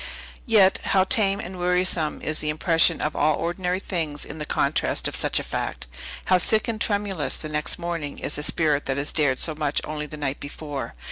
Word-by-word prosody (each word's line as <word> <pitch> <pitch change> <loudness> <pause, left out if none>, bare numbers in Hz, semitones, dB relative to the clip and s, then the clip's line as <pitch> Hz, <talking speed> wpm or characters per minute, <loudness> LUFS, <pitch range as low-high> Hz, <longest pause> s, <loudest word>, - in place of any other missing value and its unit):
Yet 200 -4 +5
how 190 -1 +3
tame 200 -2 +2
and 185 -3 -7
wearisome 180 -3 0
is 155 0 -1
the 150 - -1
impression 165 +2 +3
of 150 - -1
all 150 +1 +3
ordinary 180 +2 -1
things 160 -7 -3
in 150 - -8
the 150 - -5
contrast - - 0
with - - +1
such - - +3
a - - 0
fact! - - -3 0.4
How 185 -1 +4
sick 215 +4 +5
and 220 -2 -3
tremulous, 200 -6 -1
the 155 - -6
next 150 0 -1
morning, 170 -4 -4
is - - -2
the 150 - 0
spirit 150 -1 +1
that 135 0 0
has 140 +1 -1
dared 145 -5 +2
so 160 - 0
much 150 -1 -1
only 150 0 -4
the 155 - -8
night 145 -2 -3
before! 145 -1 -6
160 Hz, 205 wpm, -24 LUFS, 150-185 Hz, 0.4 s, Yet